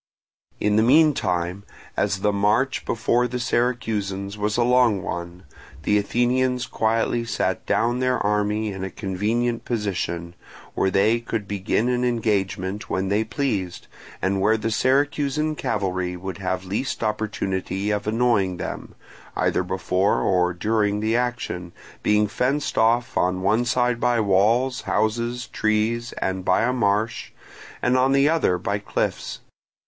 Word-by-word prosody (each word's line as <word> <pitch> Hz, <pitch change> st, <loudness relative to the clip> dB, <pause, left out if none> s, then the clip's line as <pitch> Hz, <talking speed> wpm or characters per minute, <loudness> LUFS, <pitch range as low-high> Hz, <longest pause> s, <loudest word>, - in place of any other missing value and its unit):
In 105 Hz, 0 st, +2 dB
the -, -, +5 dB
meantime, 110 Hz, -, +2 dB, 0.3 s
as 95 Hz, -, 0 dB
the 105 Hz, 0 st, +2 dB
march 105 Hz, +7 st, +1 dB
before 120 Hz, +2 st, +1 dB
the 125 Hz, +1 st, -4 dB
Syracusans 105 Hz, -5 st, -1 dB
was 105 Hz, +1 st, -1 dB
a 120 Hz, -, +3 dB
long 120 Hz, -5 st, +3 dB
one, 85 Hz, +1 st, -5 dB, 0.4 s
the 105 Hz, +4 st, +3 dB
Athenians 125 Hz, +4 st, +1 dB
quietly 115 Hz, +1 st, 0 dB
sat 115 Hz, -, -2 dB
down 120 Hz, +2 st, +1 dB
their 130 Hz, 0 st, +1 dB
army 105 Hz, +1 st, 0 dB
in 95 Hz, -1 st, -6 dB
a 95 Hz, -, -3 dB
convenient 110 Hz, +6 st, -1 dB
position, 90 Hz, -6 st, -3 dB, 0.4 s
where 95 Hz, -, +1 dB
they 105 Hz, +5 st, +3 dB
could 115 Hz, -3 st, -4 dB
begin 105 Hz, +3 st, 0 dB
an 125 Hz, 0 st, +1 dB
engagement 105 Hz, -5 st, -1 dB
when 95 Hz, 0 st, -1 dB
they 105 Hz, +2 st, +2 dB
pleased, 105 Hz, -6 st, -3 dB, 0.4 s
and 95 Hz, +1 st, +1 dB
where 110 Hz, +3 st, +3 dB
the 110 Hz, +1 st, -2 dB
Syracusan 145 Hz, +4 st, +1 dB
cavalry 95 Hz, -7 st, -2 dB
would 95 Hz, +1 st, -6 dB
have 95 Hz, -1 st, -2 dB
least 105 Hz, +7 st, -3 dB
opportunity 100 Hz, -2 st, -2 dB
of 105 Hz, 0 st, -2 dB
annoying 105 Hz, -5 st, +1 dB
them, -, -, -6 dB, 0.4 s
either -, -, +1 dB
before 95 Hz, +2 st, 0 dB
or 90 Hz, -1 st, +2 dB
during 105 Hz, +2 st, 0 dB
the 110 Hz, +2 st, 0 dB
action, 120 Hz, -8 st, -2 dB, 0.3 s
being 105 Hz, 0 st, +3 dB
fenced 130 Hz, +7 st, -1 dB
off 115 Hz, +1 st, +2 dB
on 90 Hz, +1 st, +1 dB
one 110 Hz, +5 st, +2 dB
side 120 Hz, -1 st, +1 dB
by 120 Hz, -1 st, +2 dB
walls, 110 Hz, +6 st, +2 dB
houses, 115 Hz, +3 st, -1 dB
trees, 110 Hz, +2 st, 0 dB
and 95 Hz, 0 st, -2 dB
by 95 Hz, -, +2 dB
a 125 Hz, +2 st, +1 dB
marsh, 110 Hz, -1 st, 0 dB, 0.5 s
and 125 Hz, +1 st, +3 dB
on 130 Hz, +1 st, +3 dB
the 140 Hz, +1 st, +4 dB
other 155 Hz, -, +2 dB
by 100 Hz, +3 st, -2 dB
cliffs. 100 Hz, -, -3 dB
110 Hz, 145 wpm, -23 LUFS, 95-120 Hz, 0.5 s, the